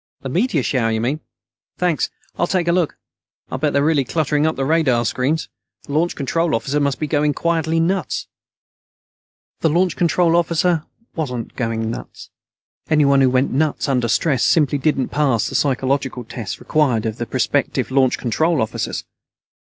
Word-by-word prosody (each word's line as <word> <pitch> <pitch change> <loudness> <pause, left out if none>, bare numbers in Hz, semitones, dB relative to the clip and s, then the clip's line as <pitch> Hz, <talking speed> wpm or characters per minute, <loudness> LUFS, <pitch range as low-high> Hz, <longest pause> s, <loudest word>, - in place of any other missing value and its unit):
"The 135 - -5
meteor 175 - +1
shower, 120 -4 +1
you 110 0 0
mean? 130 +7 -1 0.6
Thanks. 175 -4 0 0.3
I'll 175 - 0
take 180 -2 0
a - - +4
look. 170 -3 0 0.5
I'll - - -3
bet 150 -2 +1
they're 140 0 +2
really 155 -3 +3
cluttering 150 +2 0
up 160 - 0
the 135 - -1
radar 135 -6 +2
screens. 135 +8 0 0.4
The 140 - -8
Launch 165 +3 +1
Control 165 +2 0
Officer 140 +5 -1
must 140 -2 0
be 155 - -1
going 150 -1 +1
quietly 165 -1 0
nuts." 180 +2 -1 1.3
The 160 - +2
Launch 175 +3 +2
Control 170 0 +2
Officer 170 -1 +1 0.3
wasn't 125 -8 -4
going 115 -2 -2
nuts. - - -9 0.6
Anyone 140 -3 +4
who 130 - +5
went 130 +2 +1
nuts 150 +3 0
under 125 -4 +1
stress 130 +1 +1
simply 145 -3 +3
didn't 135 -2 0
pass 135 -7 +1
the - - -9
psychological 135 -2 0
tests 110 -3 -6
required 130 -8 +1
of 110 0 -3
prospective - - 0
Launch 130 -1 +3
Control 160 +7 +1
Officers. 110 0 -2
145 Hz, 160 wpm, -20 LUFS, 130-160 Hz, 1.3 s, who